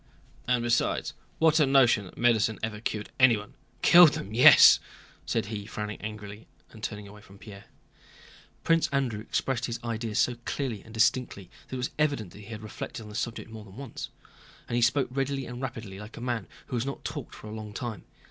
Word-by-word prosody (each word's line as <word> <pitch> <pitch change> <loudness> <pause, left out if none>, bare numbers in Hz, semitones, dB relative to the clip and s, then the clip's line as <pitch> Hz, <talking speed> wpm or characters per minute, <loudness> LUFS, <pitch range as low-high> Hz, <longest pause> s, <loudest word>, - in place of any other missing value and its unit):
And 125 -1 +2
besides, 120 -1 0 0.2
what 160 0 +4
a 150 - +4
notion 130 -7 +4
that 90 - -14
medicine 110 -3 +2
ever 110 -1 -3
cured 105 -2 -4
anyone! 115 -5 +4 0.3
Killed 175 -3 +8
them, 100 - -6
yes!" 120 - +9 0.5
said - - 0
he, 105 -1 -6
frowning 105 -1 -5
angrily 105 0 -8 0.2
and 110 - -13
turning 105 -2 -5
away 105 +1 -13
from 100 -1 -16
Pierre. 100 -1 -12 1.0
Prince 165 0 +3
Andrew 135 -6 -1
expressed 120 +3 -2
his 120 - -4
ideas 115 -2 -3
so 120 -1 +2
clearly 120 -8 -3
and 110 - -15
distinctly 110 -4 0 0.2
that - - -6
it - - -3
was 125 - -3
evident 140 - 0
he 105 0 -12
had 110 0 -8
reflected 110 +1 -7
on 105 - -11
this 105 - -4
subject 115 -1 -5
more 110 -1 -9
than 100 0 -15
once, 140 0 -7 0.6
and 120 - -3
he 120 - +2
spoke 130 +3 +3
readily 135 0 -2
and 120 +1 -7
rapidly 115 -6 -6
like 105 +2 -10
a - - -6
man 120 -6 -3 0.2
who - - -5
has 120 - 0
not 140 +1 -6
talked - - -6
for - - -12
a 105 - -7
long 110 -1 -7
time. 115 -1 -5
115 Hz, 200 wpm, -28 LUFS, 105-125 Hz, 1.0 s, yes